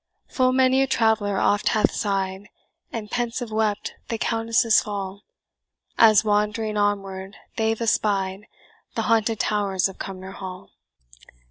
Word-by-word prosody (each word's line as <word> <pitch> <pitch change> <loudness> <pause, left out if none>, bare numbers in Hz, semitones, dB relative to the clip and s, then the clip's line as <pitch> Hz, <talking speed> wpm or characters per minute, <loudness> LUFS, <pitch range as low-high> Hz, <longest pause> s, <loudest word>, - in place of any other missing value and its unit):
Full 255 -1 +2
many 260 0 +3
a 270 - +2
traveller 220 -5 +1
oft 205 +2 +2
hath 215 - +3
sigh'd, 195 -1 -2 0.4
And 215 -2 -6
pensive 240 -1 -2
wept 215 -1 -1
the 230 - -2
Countess' 225 0 +2
fall, 200 -1 -5 0.7
As 215 -3 +6
wand'ring 210 +1 0
onward 195 -1 -2 0.2
they've 225 0 0
espied 205 -3 0 0.5
The - - -1
haunted 225 -2 +1
towers 200 -3 +1
of 195 - -12
Cumnor 190 0 -7
Hall. 185 -2 -9
210 Hz, 125 wpm, -24 LUFS, 195-225 Hz, 0.7 s, As